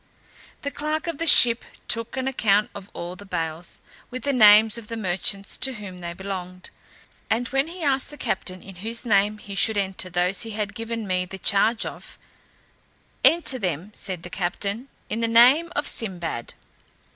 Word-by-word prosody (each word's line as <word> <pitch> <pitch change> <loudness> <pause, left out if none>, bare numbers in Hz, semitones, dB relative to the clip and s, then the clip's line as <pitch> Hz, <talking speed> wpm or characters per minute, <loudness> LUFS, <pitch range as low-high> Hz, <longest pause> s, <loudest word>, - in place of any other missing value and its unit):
The 285 - -3
clerk 305 +3 -3
of 335 -3 -4
the 330 - -1
ship 235 -5 +8 0.2
took 230 +2 -1
an 260 0 -1
account 210 -5 +1
of 200 -1 -10
all 175 +1 -7
the 195 - -12
bales, 165 -3 -5 0.3
with 255 +1 -7
the 280 - 0
names 215 -2 +7
of 230 -2 -6
the 230 - -6
merchants 195 0 -1
to 265 +1 0
whom 200 -5 -9
they 170 0 -5
belonged. 185 -1 -7 0.6
And 235 +2 0
when 270 +2 0
he 345 +1 -8
asked 275 -2 +2
the 295 - -12
captain 185 -8 -3
in 195 -2 -12
whose 230 +6 -3
name 210 -1 +2
he 205 -1 -10
should 210 +2 +2
enter 190 -2 -2
those 180 +2 0
he 230 - -1
had 205 -2 -3
given 230 -1 -5
me 185 -1 -1
the 190 +1 -9
charge 210 +4 +2
of; - - -9 1.1
"Enter 320 -6 +3
them," 180 0 -3
said 185 -5 -6
the 175 - -9
captain, 200 +7 -3 0.2
"in 215 - -3
the 230 - +1
name 255 +9 +5
of 290 - -1
Sinbad." 175 - -2
210 Hz, 180 wpm, -23 LUFS, 185-245 Hz, 1.1 s, ship